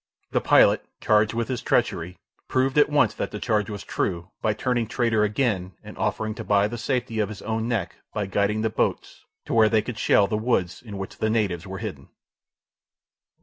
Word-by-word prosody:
The -, -, +1 dB
pilot, -, -, +5 dB, 0.2 s
charged 105 Hz, +1 st, +3 dB
with 115 Hz, -1 st, -1 dB
his 125 Hz, -3 st, -3 dB
treachery, 90 Hz, +2 st, 0 dB, 0.3 s
proved 130 Hz, +1 st, +1 dB
at 145 Hz, -, +5 dB
once 145 Hz, -8 st, +3 dB
that -, -, -3 dB
the 105 Hz, -, -6 dB
charge 105 Hz, -4 st, 0 dB
was 105 Hz, -2 st, -6 dB
true, 85 Hz, -2 st, -3 dB
by 110 Hz, -, +2 dB
turning 120 Hz, 0 st, 0 dB
traitor 115 Hz, -2 st, +1 dB
again 105 Hz, -4 st, 0 dB
and -, -, -10 dB
offering 110 Hz, 0 st, -1 dB
to -, -, -7 dB
buy 100 Hz, 0 st, +3 dB
the 120 Hz, +2 st, -6 dB
safety 120 Hz, -3 st, -1 dB
of 105 Hz, -2 st, +1 dB
his 105 Hz, -2 st, -8 dB
own 110 Hz, +1 st, -2 dB
neck 105 Hz, -8 st, -2 dB
by 105 Hz, -, -2 dB
guiding 100 Hz, +2 st, 0 dB
the 110 Hz, 0 st, 0 dB
boats 110 Hz, -, -2 dB, 0.2 s
to -, -, -4 dB
where 110 Hz, -1 st, +5 dB
they 110 Hz, -1 st, +2 dB
could 115 Hz, -1 st, -6 dB
shell 100 Hz, -, +4 dB
the 105 Hz, -, -1 dB
woods 100 Hz, -7 st, 0 dB
in 105 Hz, -4 st, -8 dB
which 95 Hz, 0 st, -7 dB
the 110 Hz, -, +1 dB
natives 100 Hz, -5 st, 0 dB
were 95 Hz, 0 st, -6 dB
hidden. -, -, -7 dB
110 Hz, 200 wpm, -25 LUFS, 100-115 Hz, 0.3 s, pilot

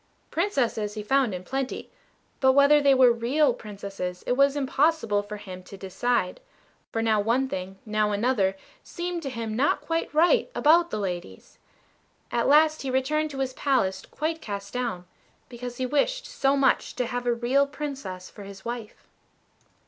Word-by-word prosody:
Princesses 245 Hz, -, 0 dB
he 210 Hz, -, -4 dB
found 265 Hz, +1 st, +2 dB
in 180 Hz, -1 st, -5 dB
plenty; 265 Hz, +5 st, -4 dB, 0.5 s
but 265 Hz, -1 st, +5 dB
whether 280 Hz, +2 st, +6 dB
they 280 Hz, -1 st, +5 dB
were 255 Hz, -2 st, +6 dB
real 250 Hz, +4 st, +2 dB
Princesses 195 Hz, -5 st, -6 dB
it -, -, -1 dB
was 275 Hz, +2 st, +4 dB
impossible 275 Hz, -6 st, +1 dB
for 205 Hz, +1 st, -8 dB
him 185 Hz, -3 st, -9 dB
to 195 Hz, +2 st, -12 dB
decide, 195 Hz, +1 st, -1 dB, 0.5 s
for 225 Hz, -, -1 dB
now 220 Hz, -2 st, +3 dB
one 235 Hz, +6 st, +1 dB
thing, 190 Hz, -5 st, -5 dB
now 215 Hz, -1 st, +1 dB
another, 205 Hz, -3 st, +1 dB, 0.3 s
seemed 350 Hz, -1 st, -4 dB
to 280 Hz, -, -4 dB
him 230 Hz, -3 st, -4 dB
not 270 Hz, +5 st, +2 dB
quite 330 Hz, 0 st, -2 dB
right 350 Hz, +11 st, +3 dB
about 335 Hz, +3 st, +4 dB
the -, -, -3 dB
ladies. 175 Hz, -, -6 dB, 0.7 s
At 235 Hz, -, +1 dB
last 310 Hz, +2 st, +5 dB
he 270 Hz, -, -3 dB
returned 295 Hz, +4 st, 0 dB
to 275 Hz, -2 st, -7 dB
his 260 Hz, -1 st, -2 dB
palace 255 Hz, -10 st, 0 dB
quite 320 Hz, +2 st, -3 dB
cast 200 Hz, -2 st, -6 dB
down, 235 Hz, -8 st, -3 dB, 0.4 s
because 245 Hz, 0 st, -7 dB
he 255 Hz, -, -1 dB
wished 295 Hz, -, 0 dB
so 280 Hz, -, +1 dB
much 270 Hz, -1 st, +2 dB
to 250 Hz, -, -1 dB
have 245 Hz, +1 st, -4 dB
a 240 Hz, -, +3 dB
real 260 Hz, +4 st, +2 dB
Princess 275 Hz, -11 st, -6 dB
for 210 Hz, -, -13 dB
his 195 Hz, -1 st, -11 dB
wife. 235 Hz, -2 st, -6 dB
250 Hz, 170 wpm, -26 LUFS, 210-280 Hz, 0.7 s, whether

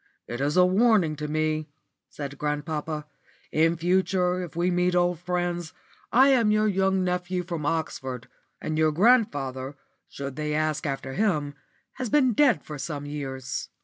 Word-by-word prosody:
"It 120 Hz, +2 st, -5 dB
is 145 Hz, +4 st, 0 dB
a 180 Hz, -, +7 dB
warning 190 Hz, -4 st, +3 dB
to 150 Hz, 0 st, -4 dB
me," 155 Hz, 0 st, -1 dB, 0.4 s
said 140 Hz, -1 st, -7 dB
grandpapa. 150 Hz, 0 st, -3 dB, 0.5 s
"In 165 Hz, +2 st, +2 dB
future 180 Hz, +1 st, +1 dB
if 175 Hz, -2 st, -7 dB
we 175 Hz, +2 st, +1 dB
meet 180 Hz, 0 st, +1 dB
old 175 Hz, -1 st, +2 dB
friends, 175 Hz, -1 st, -2 dB, 0.4 s
I 260 Hz, +4 st, +6 dB
am 240 Hz, -5 st, +4 dB
your 215 Hz, 0 st, +3 dB
young 190 Hz, -1 st, +2 dB
nephew 180 Hz, 0 st, -1 dB
from 170 Hz, -4 st, -4 dB
Oxford; 130 Hz, -6 st, -3 dB, 0.3 s
and 155 Hz, 0 st, -2 dB
your 155 Hz, -1 st, +4 dB
grandfather, 145 Hz, -, +2 dB, 0.3 s
should 140 Hz, -1 st, -6 dB
they 150 Hz, 0 st, -2 dB
ask 155 Hz, 0 st, 0 dB
after 135 Hz, -1 st, -4 dB
him, 155 Hz, -8 st, 0 dB, 0.4 s
has 255 Hz, -3 st, -3 dB
been 260 Hz, -3 st, +3 dB
dead 265 Hz, +1 st, +3 dB
for 150 Hz, -2 st, -8 dB
some 145 Hz, 0 st, -4 dB
years. 135 Hz, -3 st, -5 dB
165 Hz, 155 wpm, -26 LUFS, 150-185 Hz, 0.5 s, a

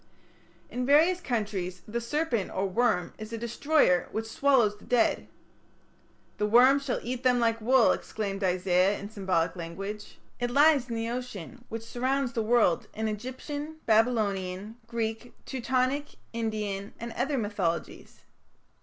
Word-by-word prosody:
In 250 Hz, -, -2 dB
various 320 Hz, +7 st, +4 dB
countries 205 Hz, -, -3 dB
the 235 Hz, +3 st, -3 dB
serpent 240 Hz, -, -1 dB
or 190 Hz, -, -1 dB
worm 200 Hz, -1 st, +1 dB
is 215 Hz, +1 st, -7 dB
a 230 Hz, -, -3 dB
destroyer 235 Hz, -, +2 dB
which 220 Hz, +1 st, -3 dB
swallows 235 Hz, -3 st, +3 dB
the -, -, -17 dB
dead. 245 Hz, -2 st, +1 dB, 1.1 s
"The 210 Hz, -, +1 dB
worm 255 Hz, +5 st, +6 dB
shall 275 Hz, -3 st, -2 dB
eat 250 Hz, +1 st, -3 dB
them 250 Hz, -1 st, +3 dB
like 230 Hz, -1 st, +1 dB
wool", 250 Hz, +1 st, +5 dB
exclaimed 200 Hz, -2 st, -3 dB
Isaiah 185 Hz, +1 st, +2 dB
in 200 Hz, +1 st, -8 dB
symbolic 185 Hz, -5 st, 0 dB
language. 195 Hz, +5 st, -7 dB, 0.2 s
It 245 Hz, 0 st, -1 dB
lies 280 Hz, -1 st, +4 dB
in 230 Hz, -, -3 dB
the 225 Hz, +1 st, -2 dB
ocean 245 Hz, -1 st, -7 dB
which 225 Hz, 0 st, -5 dB
surrounds 255 Hz, +2 st, -1 dB
the 230 Hz, -, 0 dB
world 220 Hz, -6 st, +2 dB
in 220 Hz, 0 st, -1 dB
Egyptian, 260 Hz, +8 st, -5 dB
Babylonian, 215 Hz, -3 st, +1 dB
Greek, 230 Hz, 0 st, -4 dB
Teutonic, 260 Hz, +2 st, -1 dB, 0.2 s
Indian, 210 Hz, -3 st, -3 dB
and 235 Hz, +1 st, -5 dB
other 275 Hz, +4 st, -1 dB
mythologies. 200 Hz, -7 st, -3 dB
230 Hz, 140 wpm, -28 LUFS, 205-255 Hz, 1.1 s, worm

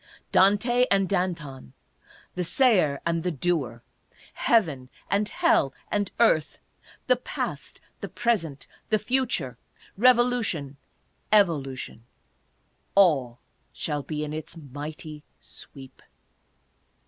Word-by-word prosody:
Dante 235 Hz, +6 st, +4 dB
and 195 Hz, -1 st, +3 dB
Danton, 165 Hz, -, -3 dB, 0.6 s
the 180 Hz, -, -2 dB
Sayer 180 Hz, -, +3 dB
and 165 Hz, 0 st, 0 dB
the 180 Hz, -, -1 dB
Doer, 140 Hz, -7 st, -2 dB, 0.5 s
Heaven 155 Hz, -, +1 dB, 0.2 s
and 205 Hz, +1 st, +1 dB
Hell 135 Hz, -1 st, +2 dB, 0.2 s
and 205 Hz, -2 st, 0 dB
Earth, 160 Hz, -10 st, +3 dB, 0.5 s
the 255 Hz, -, +3 dB
Past, -, -, -5 dB, 0.2 s
the -, -, -6 dB
Present, 175 Hz, -, -1 dB, 0.2 s
the 215 Hz, -, +3 dB
Future, 210 Hz, -, -1 dB, 0.4 s
Revolu 245 Hz, 0 st, +4 dB
tion, 145 Hz, -8 st, -4 dB, 0.5 s
Evolution 140 Hz, -, +1 dB, 0.5 s
— -, -, -43 dB
all 140 Hz, -11 st, +3 dB, 0.3 s
shall 150 Hz, -2 st, -3 dB
be 150 Hz, +1 st, -4 dB
in 150 Hz, 0 st, -5 dB
its 155 Hz, +2 st, -7 dB
mighty 150 Hz, +1 st, -8 dB, 0.2 s
sweep. 135 Hz, -2 st, -12 dB
165 Hz, 105 wpm, -26 LUFS, 140-205 Hz, 0.6 s, Dante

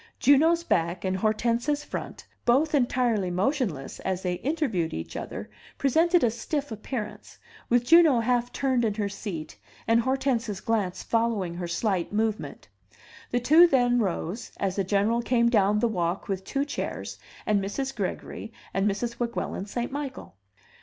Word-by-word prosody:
Juno's 320 Hz, +5 st, +5 dB
back 170 Hz, -, 0 dB
and 185 Hz, 0 st, 0 dB
Hortense's 235 Hz, +7 st, 0 dB
front, -, -, -6 dB, 0.2 s
both 280 Hz, +6 st, +3 dB
entirely 240 Hz, -7 st, +2 dB
motionless 185 Hz, -, -1 dB
as 190 Hz, -1 st, -3 dB
they 180 Hz, -1 st, 0 dB
interviewed 265 Hz, -, -1 dB
each 80 Hz, +1 st, -6 dB
other' -, -, -5 dB, 0.3 s
presented 330 Hz, +6 st, +3 dB
a 235 Hz, -, +3 dB
stiff 280 Hz, +4 st, -3 dB
appearance, 215 Hz, 0 st, -6 dB, 0.3 s
with 240 Hz, 0 st, +3 dB
Juno 320 Hz, -3 st, +6 dB
half 245 Hz, +1 st, +1 dB
turned 260 Hz, -3 st, +1 dB
in 215 Hz, -3 st, 0 dB
her 210 Hz, -2 st, -1 dB
seat 175 Hz, -, -6 dB, 0.3 s
and 230 Hz, +1 st, +4 dB
Hortense's 255 Hz, -5 st, 0 dB
glance 195 Hz, -5 st, -1 dB
following 225 Hz, -6 st, 0 dB
her 175 Hz, 0 st, -4 dB
slight 175 Hz, 0 st, -1 dB
movement; 215 Hz, +1 st, -2 dB, 0.6 s
the 245 Hz, -, +1 dB
two 315 Hz, +8 st, +7 dB
then 245 Hz, -5 st, +3 dB
rose, 190 Hz, 0 st, -2 dB
as 190 Hz, -2 st, -1 dB
the 195 Hz, -, +1 dB
General 205 Hz, +5 st, +1 dB
came 235 Hz, 0 st, +2 dB
down 210 Hz, -3 st, +3 dB
the 235 Hz, -, +2 dB
walk 180 Hz, -4 st, -2 dB
with 195 Hz, -1 st, -2 dB
two 275 Hz, +8 st, -1 dB
chairs 285 Hz, -, -5 dB, 0.3 s
and 205 Hz, -2 st, +2 dB
Mrs. 270 Hz, +7 st, -3 dB
Gregory 210 Hz, +2 st, -4 dB, 0.2 s
and 195 Hz, +2 st, +2 dB
Mrs. 235 Hz, +4 st, -3 dB
Weguelin 235 Hz, -4 st, -3 dB
St. 240 Hz, +4 st, -3 dB
Michael. 280 Hz, -2 st, -6 dB
230 Hz, 155 wpm, -27 LUFS, 195-260 Hz, 0.6 s, two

